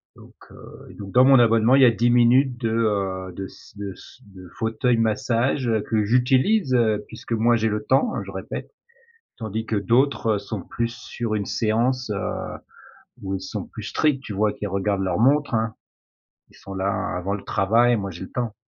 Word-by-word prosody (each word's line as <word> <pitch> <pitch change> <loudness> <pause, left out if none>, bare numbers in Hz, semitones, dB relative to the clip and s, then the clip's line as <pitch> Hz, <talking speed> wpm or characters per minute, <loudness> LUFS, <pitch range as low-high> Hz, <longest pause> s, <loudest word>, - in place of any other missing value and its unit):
Donc, - - -16 0.2
heu - - -14
et - - -12
donc 100 -2 -9
dans 125 +1 +5
mon 135 -1 +7
abonnement, 115 +1 +4
il 135 - +5
y - - +8
a 120 - +6
10 115 +2 +1
minutes 125 +2 +4
de 115 -2 -2
heu, 100 -5 -1
de 95 - -5
s - - -17
de 100 -1 -5
se 130 - -16
de 95 -3 -14
fauteuil 115 +2 0
massage 115 +3 0 0.2
que 110 -2 +1
j'utilise, 130 - +2
heu, 110 -4 +2
puisque 115 +1 -7
moi 115 +1 +3
j'ai 110 - 0
le 105 -1 -2
temps, 135 - +2
je - - -9
répète, - - -7 0.6
tandis 110 -1 -4
que 110 - -2
d'autres 115 0 +2
sont 100 -1 -6
plus 115 +4 -4
sur 115 -3 -4
une 100 -2 -2
séance, 120 +2 0
heu, 100 - -4 0.7
où 95 0 -3
ils - - -7
sont 95 - -5
plus - - -10
stricts 140 -4 0
tu 105 - -6
vois, 105 +1 +1
qu'ils 105 - -6
regardent 100 +1 -1
leur 95 +2 -1
montre, 145 +1 +3
hein, 110 0 0 0.8
ils - - -20
sont 95 0 -10
là 95 0 -2
avant 95 +3 -2
le 100 - -6
travail, 115 +4 +2
moi 100 -2 -4
j'ai 85 - -9
le 95 - -8
temps. 120 -3 -3
115 Hz, 200 wpm, -23 LUFS, 100-125 Hz, 0.8 s, y